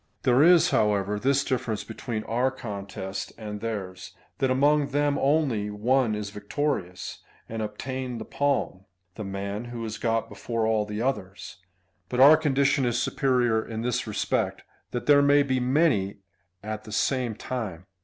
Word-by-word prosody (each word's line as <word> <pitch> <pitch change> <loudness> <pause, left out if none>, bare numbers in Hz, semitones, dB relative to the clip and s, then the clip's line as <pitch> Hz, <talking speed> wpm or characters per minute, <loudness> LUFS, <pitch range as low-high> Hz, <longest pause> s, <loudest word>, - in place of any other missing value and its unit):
There 125 +1 +4
is, 175 +1 +6
however, 105 -4 +1
this 140 +4 +2
difference 115 -5 -2
between 110 -1 -5
our 125 +4 +1
contest 100 -6 -6
and 105 -2 -6
theirs, 95 -5 -5 0.2
that 135 - +2
among 145 +3 +3
them 145 0 +1
only 135 -8 +1
one 115 +2 +1
is 105 -1 -5
victorious, 105 -4 -3 0.3
and 115 0 -4
obtains 125 +4 -4
the 110 - -6
palm 140 -9 -1
— 90 -1 -48
the 110 - -5
man 100 +3 -4
who 120 -1 -6
has 110 0 -5
got 115 -1 0
before 115 -2 -3
all 110 -1 +1
the 105 +2 -3
others 100 -9 -4
f 90 - -35 0.4
but 125 - -2
our 140 +4 +9
condition 140 -2 +2
is 120 -1 +1
superior 125 -5 +1
in 110 0 -5
this 125 -1 -1
respect, 105 - -1 0.3
that 120 - -4
there 145 -1 +6
may 145 0 +5
be 130 -2 0
many 125 - +2 0.5
at 110 0 -5
the 110 - -9
same 125 +1 0
time. 105 -9 -5
115 Hz, 165 wpm, -26 LUFS, 105-135 Hz, 0.5 s, our